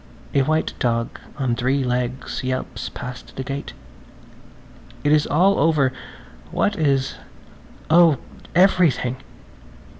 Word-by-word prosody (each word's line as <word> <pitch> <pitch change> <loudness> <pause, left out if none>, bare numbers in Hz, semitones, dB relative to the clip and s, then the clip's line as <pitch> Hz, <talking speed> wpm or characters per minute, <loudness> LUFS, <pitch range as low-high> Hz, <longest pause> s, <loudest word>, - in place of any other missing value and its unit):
A 140 - +4
white 155 +4 0
dog 115 -1 -1 0.2
on 130 -4 0
three 130 +3 +1
legs 125 +1 -2
yelps 130 0 -3
past 125 0 -8
the 135 - -4
gate. 135 +1 -5 1.3
It 145 - +2
is 150 -1 +4
all 185 +6 +3
over! 150 -5 +3 0.6
What 205 - 0
is? 140 -5 +1 0.7
Oh, 165 -3 +6 0.4
everything! 170 -9 +3
135 Hz, 110 wpm, -22 LUFS, 130-155 Hz, 1.3 s, Oh